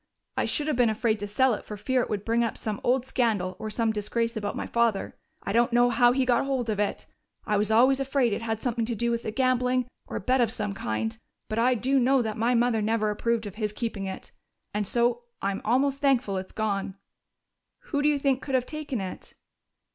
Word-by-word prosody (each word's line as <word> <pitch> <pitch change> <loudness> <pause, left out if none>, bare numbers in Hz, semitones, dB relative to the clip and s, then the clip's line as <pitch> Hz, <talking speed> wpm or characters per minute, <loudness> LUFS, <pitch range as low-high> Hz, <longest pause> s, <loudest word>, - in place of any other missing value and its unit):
I - - +1
should 295 - 0
have 305 - 0
been 240 -2 +4
afraid 220 0 0
to 205 - -4
sell 255 +5 +3
it - - -4
for 210 - -7
fear 255 +5 +1
it - - -3
would 205 -1 -3
bring 235 +1 +2
up 230 - -2
some 215 -2 -4
old 255 +1 +2
scandal 210 -8 0
or 220 0 -4
some 225 +1 0
disgrace 230 +2 -2
about 205 -2 -3
my - - -3
father. 235 -4 0 0.3
I - - -3
don't 240 +1 +3
know 240 +1 +4
how 240 0 +5
he 260 +1 +1
got 245 -2 +3
hold 260 -4 -1
of 205 - -2
it 205 - -1 0.4
I 210 - +1
was 205 +1 +2
always 255 +5 +5
afraid 270 -4 +1
it 215 - -2
had 225 -1 -2
something 235 -2 0
to 235 0 -2
do 235 +2 0
with 235 -1 -2
gambling 255 -1 +2 0.2
or - - -7
a - - -2
bet 255 0 +2
of 230 -2 +2
some 210 -3 -2
kind 110 - -2 0.3
but 215 +1 -2
I 250 +2 +4
do 265 +4 +2
know 260 0 +3
that 220 -1 -3
my 235 +3 +1
mother 235 -2 +2
never 215 0 +1
approved 230 +1 -1
of 205 - -6
his 210 -1 -1
keeping 215 -4 -3
it. 190 - -7 0.4
And 205 -1 -1
so 240 +1 +1
I'm 195 0 -2
almost 270 +4 +2
thankful 255 -8 +2
it's 185 0 -5
gone." 200 -3 -2 1.0
"Who 285 -3 +1
do 295 - +4
you 295 - +2
think 270 -2 +1
could 270 - -2
have 250 -1 +2
taken 300 -7 -4
it?" 185 -1 -8
235 Hz, 230 wpm, -27 LUFS, 210-255 Hz, 1.0 s, how